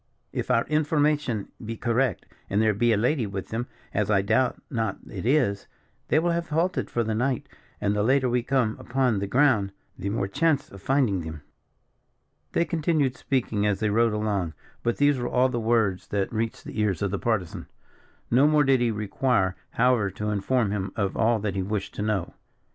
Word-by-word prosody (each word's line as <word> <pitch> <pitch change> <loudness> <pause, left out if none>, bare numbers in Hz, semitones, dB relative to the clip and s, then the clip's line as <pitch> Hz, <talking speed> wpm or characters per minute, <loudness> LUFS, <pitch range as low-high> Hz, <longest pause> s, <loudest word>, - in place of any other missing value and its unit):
"If - - -3
our 115 - +3
information 150 - +1
be 115 +1 -5
correct, 120 -2 0 0.2
and 100 - +1
there 110 -1 +3
be 120 +4 +2
a 110 - +3
lady 120 +1 +1
with 95 -1 -6
them, 120 +3 -3 0.3
as 105 0 0
I 95 -2 +3
doubt 130 +6 +1
not 115 -3 -1
it 100 +1 -5
is, 125 -8 +2 0.4
they - - +2
will 170 +2 +2
have 170 0 -2
halted 170 +4 0
for 120 - 0
the 110 0 -2
night, 125 +3 -1 0.3
and 105 0 0
the 105 - +1
later 130 +4 +3
we 125 0 +1
come 125 -3 +1
upon 125 -4 0
the 100 - -2
ground, 115 -5 +3 0.3
the 100 +1 -2
more 100 -1 -1
chance 145 +5 +1
of 100 - -11
finding 130 -8 +2
them." 80 -2 -7 1.1
They 170 - +2
continued 155 -4 0
speaking 115 -7 0
as 100 -2 0
they 105 -2 +1
rode 115 +1 +3
along; 100 -7 -1 0.3
but 120 - 0
these 145 -2 +3
were 120 - -2
all 130 +1 +3
the 120 - -2
words 110 -5 +1
that 100 +2 -2
reached 115 0 -2
the - - -6
ears 100 -4 0
of 100 - 0
the 100 - -2
Partisan. 100 -5 -2 0.6
No 130 +5 +5
more 150 -1 +4
did 135 -2 +3
he 120 - +2
require, 105 -2 0 0.2
however, 120 -4 +3
to 105 +2 -3
inform 105 +2 +1
him 100 -2 -2
of 100 -4 -1
all 115 +1 +3
that 100 -2 -1
he 95 - -1
wished 100 +1 -3
to - - -5
know. 105 -4 -1
115 Hz, 200 wpm, -26 LUFS, 100-130 Hz, 1.1 s, No